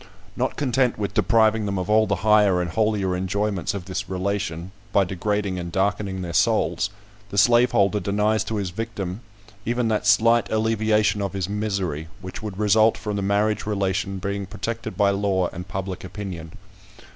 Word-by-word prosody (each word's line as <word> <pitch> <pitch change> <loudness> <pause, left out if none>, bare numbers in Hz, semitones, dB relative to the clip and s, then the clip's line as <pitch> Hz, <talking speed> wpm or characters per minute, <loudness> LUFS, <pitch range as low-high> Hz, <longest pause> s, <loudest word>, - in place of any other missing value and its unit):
Not - - -1
content 130 -2 +1
with 100 -2 -3
depriving 110 -2 +3
them 100 -1 -2
of 90 -1 -2
all 110 +1 +4
the 100 - +1
higher 105 -4 +5
and 90 -2 -2
holier 105 -3 +1
enjoyments 100 +1 -1
of 95 -3 -5
this 95 +2 -4
relation, 95 -2 -3 0.2
by 100 - +4
degrading 95 +1 -2
and 85 -1 -5
darkening 95 0 -1
their 85 -1 -5
souls, 100 - +2 0.4
the 100 - -6
slaveholder 115 -3 +4
denies 105 +2 +1
to 110 - -3
his 100 -4 -2
victim 100 -1 -5 0.4
even 120 +1 0
that 105 -1 0
slight 115 +3 +4
alleviation 110 -1 +2
of 100 -1 -2
his 95 -2 -2
misery, 100 -7 -2
which 95 +1 -8
would 105 -4 -6
result 110 +1 +4
from 105 -1 -4
the 100 - -1
marriage 105 +2 +1
relation 100 -1 -1
being 100 +1 -3
protected 115 0 -5
by 100 -1 +4
law 100 -2 0
and 90 +1 -7
public 95 +1 -5
opinion. 90 -4 -7
100 Hz, 170 wpm, -23 LUFS, 95-110 Hz, 0.4 s, higher